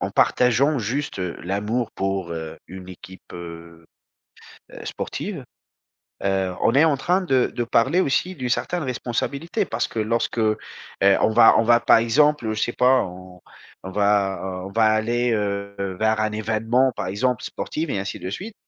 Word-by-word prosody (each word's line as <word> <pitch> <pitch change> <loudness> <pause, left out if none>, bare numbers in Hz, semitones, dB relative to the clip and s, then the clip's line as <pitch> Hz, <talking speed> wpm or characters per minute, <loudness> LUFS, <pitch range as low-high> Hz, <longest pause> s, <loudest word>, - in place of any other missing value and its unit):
en - - -2
partageant 135 +4 +3
juste, 125 +4 -3
heu, 90 -2 -3
l'amour 105 +6 -2
pour, 95 -3 -2
heu, 80 -1 -6
une 95 0 -10
équipe, 95 +1 -12
heu, 85 -1 -10 1.0
sportive. - - -5 0.8
Heu, 95 -2 0
on 115 - +4
est 145 +4 +6
en 150 - +2
train 180 +8 +1
de 135 -9 +1
de 120 - -1
parler 130 +9 +2
aussi 180 +5 0
d'une 130 -5 -4
certaine 175 +7 -1
responsabilité, 140 - -2
parce - - -2
que - - -7
lorsque, 115 +2 -1
heu, 110 -1 +2 0.5
on 100 +2 +4
va 115 +1 +6
on - - +4
va 120 +1 +5
par - - +5
exemple, 125 +1 +2
je 105 - -3
sais 120 - 0
pas, 130 +1 +4
on 90 0 -11 0.4
on 95 - -6
va, 100 -1 +1 0.2
heu, 95 - -6
on - - -13
va 110 +1 +3
aller, 115 +3 +1
heu, 100 -2 -2 0.3
vers 110 0 +2
un 110 0 0
événement, 115 +4 +1
par - - -3
exemple, 110 +5 -1
sportive 155 0 -4
et 100 - -1
ainsi 95 0 -4
de 95 - -6
suite. 200 - -6
110 Hz, 175 wpm, -23 LUFS, 95-130 Hz, 1.0 s, est